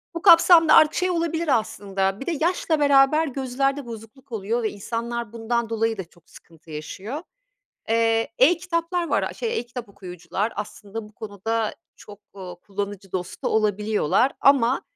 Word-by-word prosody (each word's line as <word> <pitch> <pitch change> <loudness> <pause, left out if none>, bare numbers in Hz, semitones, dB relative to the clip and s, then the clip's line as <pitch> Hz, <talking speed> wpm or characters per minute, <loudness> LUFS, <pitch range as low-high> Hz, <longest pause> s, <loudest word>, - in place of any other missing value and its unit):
bu 335 - -4
kapsamda 335 -2 +7
artık 305 - +6
şey 365 0 +1
olabilir 330 -5 +1
aslında 195 -2 -3
Bir 270 - -7
de - - -1
yaşla 330 -2 +1
beraber 285 +2 +4
gözlerde 275 +1 -2
bozukluk 230 +3 -11
oluyor 225 +2 -2
ve 220 - +1
insanlar 235 +2 -5
bundan 235 0 -2
dolayı 225 0 0
da 190 - -4
çok 170 0 -26
sıkıntı 165 -1 -17
yaşıyor. 195 - -6 0.7
Eee, 225 0 +2
e-kitaplar 340 +3 +1
var, - - +1
a, - - -3
şey 465 -1 -2
e-kitap 240 -1 -8
okuyucular 195 +2 -5
aslında 210 +1 -7
bu - - -22
konuda 220 +2 -3 0.2
çok, 205 0 -14 0.2
ııı, 180 -2 -8
kullanıcı 200 -1 -6
dostu 180 -1 -3
olabiliyorlar 210 - +1
ama 265 -2 +4
230 Hz, 150 wpm, -23 LUFS, 205-280 Hz, 0.7 s, kapsamda